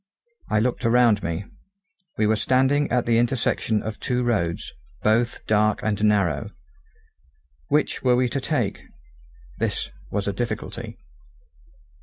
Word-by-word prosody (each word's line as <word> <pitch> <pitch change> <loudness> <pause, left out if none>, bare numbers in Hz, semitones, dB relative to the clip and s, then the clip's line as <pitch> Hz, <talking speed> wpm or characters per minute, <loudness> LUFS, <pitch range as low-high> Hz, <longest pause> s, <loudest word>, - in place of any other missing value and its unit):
I 105 - +2
looked 125 +3 -1
around 115 -3 +4
me. 85 +3 -3 0.7
We 110 - +2
were 110 +1 +3
standing 130 +5 +2
at 125 -1 +2
the 115 -1 +3
intersection 120 -3 0
of 110 -1 -5
two 125 0 -1
roads, 100 -9 -1 0.3
both 115 +2 +1
dark 105 0 +2
and 105 -1 -1
narrow. 100 -9 +2 1.2
Which 150 - +1
were 125 -1 +4
we 125 0 +2
to 135 +3 -2
take? - - -1 0.8
This - - -1 0.2
was 100 -1 -2
a 100 - 0
difficulty. 120 +4 -4
110 Hz, 130 wpm, -24 LUFS, 105-125 Hz, 1.2 s, around